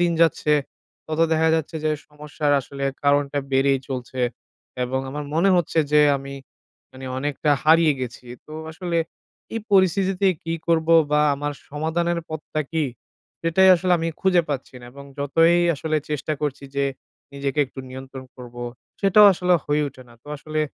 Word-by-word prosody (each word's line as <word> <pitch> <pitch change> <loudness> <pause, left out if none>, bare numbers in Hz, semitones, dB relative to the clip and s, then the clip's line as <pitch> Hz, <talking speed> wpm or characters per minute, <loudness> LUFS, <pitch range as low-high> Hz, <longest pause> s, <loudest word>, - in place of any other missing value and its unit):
দিন 175 -1 +2
যাচ্ছে, 155 -2 +2 0.5
তত 155 0 -2
দেখা 160 0 +3
যাচ্ছে 160 0 -2
যে 155 - +2 0.2
সমস্যার 150 0 -2
আসলে 140 +2 -6 0.2
কারণটা 145 0 +2
বেড়েই 135 0 +3
চলছে 130 -1 -5 0.6
এবং 130 +2 -2
আমার 145 +1 -5
মনে 175 +5 +3
হচ্ছে 165 -1 0
যে 150 - +6 0.2
আমি 140 0 -8 0.6
মানে 130 0 -10
অনেকটা 145 +2 -1
হারিয়ে 160 0 +5
গেছি। 125 0 -6 0.2
তো 155 - -12 0.2
আসলে 170 +1 -3 0.6
এই 225 - -2
পরিস্থিতিতে 190 0 +3 0.2
কী 165 0 -2
করব? 165 -1 +1 0.2
বা 150 - +3
আমার 145 +1 -3 0.2
সমাধানের 165 +3 -1
পথটা 155 0 -4
কী? 160 -2 +1 0.6
সেটাই 165 +3 +4
আসলে 180 +1 +1
আমি 165 0 -1
খুঁজে 180 -2 +3
পাচ্ছি 135 -2 -4
না। - - -12
এবং 140 0 -11
যতই 165 +5 +3 0.2
আসলে 155 +2 -2
চেষ্টা 150 +1 -2
করছি 145 -2 -3
যে 140 - +2 0.5
নিজেকে 140 0 -3
একটু 130 - -9
নিয়ন্ত্রণ 130 0 -9
করবো, 120 -1 -9 0.4
সেটাও 205 +1 +7
আসলে 180 0 +2
হয়ে 150 +1 +1
ওঠে 130 -1 -14
না। 120 - -17
তো - - -16
আসলে 155 +2 -3
150 Hz, 160 wpm, -23 LUFS, 140-165 Hz, 0.6 s, সেটাও